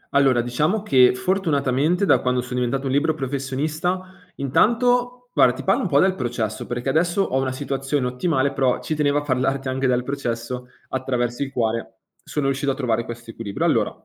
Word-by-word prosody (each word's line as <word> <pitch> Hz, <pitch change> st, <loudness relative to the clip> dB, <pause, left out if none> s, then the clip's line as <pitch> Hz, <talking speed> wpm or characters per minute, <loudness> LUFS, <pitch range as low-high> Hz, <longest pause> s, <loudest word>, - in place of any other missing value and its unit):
Allora, 135 Hz, -3 st, +4 dB
diciamo, 150 Hz, -, 0 dB
che 130 Hz, -9 st, +5 dB
fortunatamente, 160 Hz, 0 st, +1 dB
da -, -, +4 dB
quando 125 Hz, -1 st, 0 dB
so 125 Hz, 0 st, -8 dB
diventato 125 Hz, +2 st, -1 dB
un 135 Hz, -, -1 dB
libero 150 Hz, +3 st, +2 dB
professionista, 150 Hz, +7 st, -2 dB, 0.2 s
intanto 245 Hz, -, +1 dB
guarda, 125 Hz, -, +5 dB
ti -, -, -7 dB
parlo 195 Hz, -, +2 dB
un -, -, -1 dB
po' 140 Hz, -4 st, +3 dB
del 190 Hz, +3 st, +4 dB
processo, 120 Hz, -, -3 dB
perché 120 Hz, +2 st, -3 dB
adesso 170 Hz, +6 st, +2 dB
ho 135 Hz, -7 st, 0 dB
una 130 Hz, -1 st, -1 dB
situazione 135 Hz, 0 st, -2 dB
ottimale, 135 Hz, +2 st, 0 dB
però 130 Hz, -2 st, +1 dB
ci -, -, -3 dB
tenevo 145 Hz, -1 st, +1 dB
a -, -, -5 dB
parlarti 135 Hz, 0 st, 0 dB
anche 130 Hz, +1 st, 0 dB
del 125 Hz, -1 st, +1 dB
processo, 125 Hz, -2 st, -4 dB, 0.2 s
attraverso 125 Hz, -1 st, -2 dB
il 140 Hz, -1 st, -2 dB
quale 115 Hz, -2 st, -2 dB, 0.2 s
sono 150 Hz, -2 st, -3 dB
riuscito 135 Hz, +1 st, 0 dB
a -, -, -3 dB
trovare 115 Hz, -3 st, -1 dB
quest'equilibrio. 115 Hz, -3 st, -5 dB
Allora, -, -, +2 dB
135 Hz, 180 wpm, -22 LUFS, 125-150 Hz, 0.2 s, che